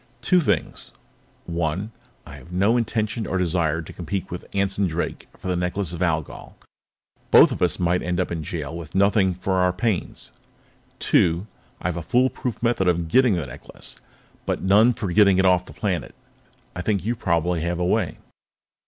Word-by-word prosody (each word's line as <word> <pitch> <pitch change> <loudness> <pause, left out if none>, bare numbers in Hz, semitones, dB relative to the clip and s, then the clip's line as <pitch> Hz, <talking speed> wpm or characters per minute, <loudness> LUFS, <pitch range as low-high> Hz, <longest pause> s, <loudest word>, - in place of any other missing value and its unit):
"Two 185 - +4
things. - - -1 0.5
One: 85 +5 -2 0.3
I - - -10
have 85 - -14
no 100 +6 +2
intention 110 -1 -1
or 95 - -1
desire 85 -3 0
to - - -10
compete 90 +2 -4
with 90 - -7
Anson 100 0 0
Drake 85 +1 -4
for - - -8
the 90 - 0
Necklace 90 0 -2
of 85 - -6
Algol. 80 -4 -2 0.7
Both - - +7
of - - -4
us - - +2
might 90 +1 +1
end 90 +1 -2
up 90 - -1
in 85 -2 -2
jail 80 0 -5
with 85 -1 -8
nothing 100 -1 +3
for 95 +1 -1
our 90 0 +3
pains. 100 0 -2 0.7
"Two: 85 +3 +2 0.3
I - - -3
have 90 - -3
a - - -3
foolproof 125 +3 0
method 115 -6 +2
for 90 - +5
getting 95 +7 +3
the 85 -5 -2
necklace, - - -9 0.5
but - - -1
none 105 +6 +5
for 105 -6 -4
getting 100 -2 +5
it 95 - +3
off 90 -1 +4
the - - -10
planet. 95 -7 -3 0.6
I 90 - -3
think 100 -1 -1
you 120 +2 0
probably 85 -5 0
have 85 +1 -1
a 90 - 0
way." 90 - 0
90 Hz, 180 wpm, -23 LUFS, 85-100 Hz, 0.7 s, Both